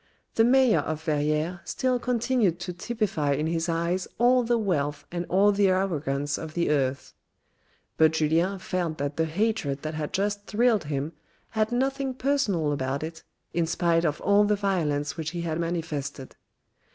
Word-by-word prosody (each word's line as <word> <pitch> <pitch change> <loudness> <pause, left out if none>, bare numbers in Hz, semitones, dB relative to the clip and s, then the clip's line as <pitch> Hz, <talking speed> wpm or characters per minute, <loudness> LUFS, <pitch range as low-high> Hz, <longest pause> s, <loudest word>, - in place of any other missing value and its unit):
The 225 - +4
mayor 255 -1 +5
of 155 0 -3
Verrieres 155 +3 0
still 255 -1 0
continued 235 -7 +1
to 180 0 -4
typify 175 -7 -1
in 150 +2 -1
his 165 +1 -1
eyes 170 +2 0
all 250 +2 +5
the 240 0 +1
wealth 150 -9 -1
and 175 0 -3
all 200 +3 +4
the 200 0 +3
arrogance 145 -7 0
of 160 -1 -7
the 170 -3 +1
earth; 135 -2 -1 0.8
but 160 0 +5
Julien 165 +5 +1
felt 175 -4 -2
that 145 0 -3
the 160 - +2
hatred 160 -5 -1
that 155 0 -3
had 150 -1 -4
just 205 +2 -1
thrilled 225 -4 +2
him 145 +2 -3 0.4
had 220 0 0
nothing 265 +1 -1
personal 235 - +1
about 140 0 -2
it 160 0 -6 0.3
in 170 -1 +1
spite 170 0 +2
of 150 -3 0
all 200 +1 +4
the 210 0 +2
violence 155 -7 -1
which 160 -1 -3
he - - -2
had 165 -1 -2
manifested. 155 -6 -4
170 Hz, 165 wpm, -26 LUFS, 155-205 Hz, 0.8 s, mayor